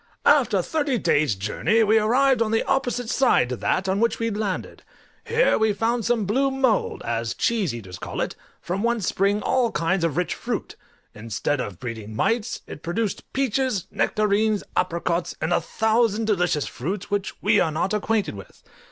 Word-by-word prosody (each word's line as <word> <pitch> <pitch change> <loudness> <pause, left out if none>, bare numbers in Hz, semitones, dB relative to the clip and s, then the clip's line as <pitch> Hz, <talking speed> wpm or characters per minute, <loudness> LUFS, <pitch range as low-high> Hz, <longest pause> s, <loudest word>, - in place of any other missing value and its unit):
After - - +4
thirty 295 -4 -1
eight 235 - -1
days' 145 -8 +2
journey 110 - +1
we 220 +1 +4
arrived 255 +4 +3
on 225 - +2
the 225 +1 +1
opposite 250 -3 -1
side 240 - +3
to 125 - -2
that 190 +9 0
on 190 +1 +1
which 230 +1 +2
we 230 0 -1
landed: 205 -3 -3 0.4
here 465 +2 +2
we 220 -1 +3
found 225 +2 0
some 235 -3 +1
blue 265 +8 +2
mould, 265 -4 0
as 115 0 -2
cheese 215 - 0
eaters 95 -7 -8
call - - -6
it, - - -2 0.2
from 180 +3 -3
whence 235 -3 0
spring 200 +2 +1
all 255 -3 +2
kinds 170 +2 0
of 165 -2 0
rich 180 - 0
fruit; - - -4 0.4
instead 115 +6 -2
of 100 -7 -6
breeding 110 -3 -6
mites 225 - 0
it - - -9
produced 200 +5 -3
peaches, 260 -6 0
nectarines, 210 0 +1
apricots, 170 -1 -1
and 160 +3 0
a - - +2
thousand 220 0 +1
delicious 180 -8 +1
fruits 185 +10 -5
which 200 -1 -2
we 210 0 +3
are 160 - +2
not 165 +6 -1
acquainted 210 - 0
with. 100 -2 -12
210 Hz, 180 wpm, -24 LUFS, 165-230 Hz, 0.4 s, After